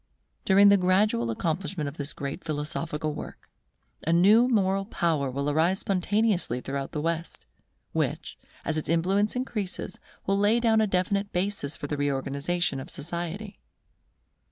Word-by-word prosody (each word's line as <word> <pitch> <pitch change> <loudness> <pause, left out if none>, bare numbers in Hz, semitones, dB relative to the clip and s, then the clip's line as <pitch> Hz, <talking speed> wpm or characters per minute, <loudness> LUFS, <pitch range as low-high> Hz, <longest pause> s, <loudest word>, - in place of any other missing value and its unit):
During 200 +1 +7
the 200 - +6
gradual 185 - +2
accomplishment 160 - -2
of 140 +3 -7
this 145 0 -3
great 140 +5 -5
philosophical 155 0 -3
work, - - -9 0.5
a 165 - -1
new 205 +8 +6
moral 195 -4 +2
power 160 -9 0
will 140 +2 -2
arise 160 +6 +2
spontaneously 195 - +1
throughout 135 +1 -4
the 150 - -3
West, 165 +1 -3 0.5
which, - - -2 0.3
as 160 - -1
its 155 - -4
influence 190 +7 +2
increases, 210 -8 -4 0.3
will 195 +1 +1
lay 210 +3 +4
down 225 -2 +3
a 215 - +2
definite 200 +2 0
basis 180 -5 -2
for - - -5
the 145 0 -3
reorganization 140 +3 -1
of 130 - -8
society. 175 +6 -5
175 Hz, 145 wpm, -27 LUFS, 150-200 Hz, 0.5 s, During